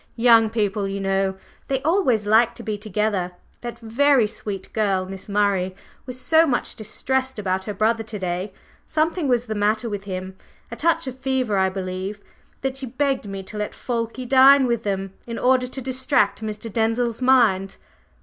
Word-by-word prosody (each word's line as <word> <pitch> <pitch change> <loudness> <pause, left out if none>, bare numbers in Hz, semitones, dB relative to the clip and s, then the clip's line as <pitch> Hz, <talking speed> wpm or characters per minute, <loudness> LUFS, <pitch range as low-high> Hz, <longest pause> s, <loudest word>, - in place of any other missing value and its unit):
"Young 230 -2 +5
people, 205 -2 -1
you 195 0 -3
know! 195 0 0 0.3
They 270 -1 0
always 285 - +2
like 225 +3 +4
to 235 - -8
be 215 -2 -2
together! 205 -3 -1 0.3
That 240 -1 -6
very 250 +2 +3
sweet 205 -2 -6
girl, 195 -4 +1
Miss 190 +1 -9
Murray, 200 -2 +1 0.3
was 255 0 -7
so 320 +4 +4
much 245 -4 -1
distressed 260 +4 -2
about 190 -2 -1
her 210 - -3
brother 225 +3 +2
to 220 -1 -5
day, 185 +1 -3 0.4
something 315 +1 0
was 245 -2 +2
the 220 - -3
matter 215 +2 0
with 205 -2 -5
him 185 -1 -5 0.4
a - - -4
touch 335 0 +1
of 260 -1 -7
fever, 260 -5 0
I 190 0 +3
believe, 190 +2 -5 0.4
that 270 0 -2
she 270 -1 -4
begged 265 -2 -1
me 195 -1 -6
to 210 - -8
let 210 - -3
Fulke 240 +1 -3
dine 270 +1 +7
with 235 -2 0
them 195 -2 -3
in 230 -1 -5
order 255 0 +3
to 265 +1 -5
distract 260 -4 +1
Mr. 215 0 -5
Denzil's 230 +1 0
mind. 230 -7 +3
220 Hz, 180 wpm, -23 LUFS, 200-255 Hz, 0.4 s, dine